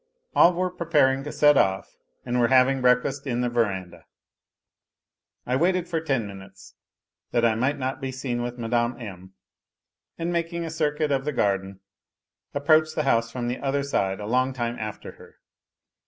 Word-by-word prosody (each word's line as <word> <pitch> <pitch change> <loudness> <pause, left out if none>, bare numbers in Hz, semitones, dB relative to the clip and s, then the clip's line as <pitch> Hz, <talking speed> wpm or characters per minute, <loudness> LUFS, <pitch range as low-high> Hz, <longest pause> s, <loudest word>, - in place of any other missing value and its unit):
All 175 +1 +6
were 185 +1 -1
preparing 150 -6 +2
to 150 - -5
set 145 -1 +5
off, 95 0 0 0.3
and 125 0 -1
were 120 - +4
having 130 +1 +4
breakfast 125 +3 +2
in 120 -1 -1
the 125 - 0
verandah. 95 -8 -2 1.4
I 125 - 0
waited 180 +4 +1
for 165 -1 -2
ten 135 -8 -1
minutes, 95 -1 -12 0.6
that 120 -1 +1
I 115 - +4
might 130 +6 0
not 130 0 -3
be 135 -1 -3
seen 130 -2 -3
with 120 0 -4
Mme. 120 +1 -1
M., 95 -4 -10 0.8
and 170 +1 -2
making 170 0 -2
a 165 - -5
circuit 150 -1 -1
of 135 -1 +1
the 150 - -2
garden 95 -5 -1 0.7
approached 155 +2 +3
the 155 - 0
house 115 -4 +2
from 120 0 -4
the 125 +1 -3
other 140 0 -1
side 95 -8 -1
a 105 - -6
long 130 +4 +1
time 120 -2 -3
after 110 -1 -6
her. - - -17
130 Hz, 170 wpm, -25 LUFS, 115-145 Hz, 1.4 s, All